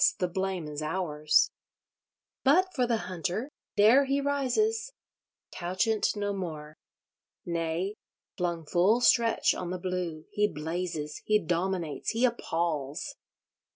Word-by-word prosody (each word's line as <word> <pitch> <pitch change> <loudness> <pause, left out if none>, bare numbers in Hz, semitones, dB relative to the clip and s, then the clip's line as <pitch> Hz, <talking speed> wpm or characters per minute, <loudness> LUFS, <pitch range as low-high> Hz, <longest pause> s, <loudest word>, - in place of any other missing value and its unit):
the 180 - 0
blame 190 -2 -2
is 150 0 -5
ours. 155 -2 +2 0.9
But 365 +8 +4
for 250 -3 +1
the 235 -1 +2
Hunter—there 210 - +2
he 275 +1 +1
rises—couchant 280 - -1
no 205 -1 -1
more. 155 -5 -6 0.7
Nay, 170 +3 -1 0.4
flung 170 -3 -2
full 185 +9 +3
stretch 235 -2 +4
on 180 - -4
the 185 - -2
blue, 180 -3 -3
he 210 0 +2
blazes, 160 -2 -4
he 215 - +4
dominates, 175 -4 -1
he 235 +3 +3
appals! 165 - -2
185 Hz, 110 wpm, -29 LUFS, 165-225 Hz, 0.9 s, But